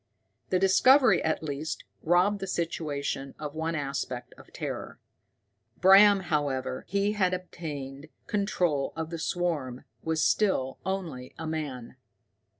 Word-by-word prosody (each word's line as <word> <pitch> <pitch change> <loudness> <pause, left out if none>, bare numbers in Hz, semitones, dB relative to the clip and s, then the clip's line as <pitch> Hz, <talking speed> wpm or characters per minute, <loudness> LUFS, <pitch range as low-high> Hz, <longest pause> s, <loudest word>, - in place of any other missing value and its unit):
The 185 - +3
discovery 210 +3 +5
at 160 0 0
least 150 +1 -4 0.2
robbed 180 +5 +3
the 195 - -4
situation 145 -5 -3
of 150 -1 -6
one 160 +1 -2
aspect 135 -4 -4
of - - -17
terror. - - -6 0.8
Bram, 195 +1 +7
however 145 -6 -2
he 200 +1 +1
had 185 -3 +1
obtained 150 -5 -7 0.2
control 180 -9 0
of 160 0 -4
the 165 - -4
swarm, 155 -8 -2 0.2
was 160 -1 0
still 135 -11 +1
only 170 -10 -4
a 160 - -6
man. 145 -6 -5
160 Hz, 125 wpm, -28 LUFS, 140-185 Hz, 0.8 s, Bram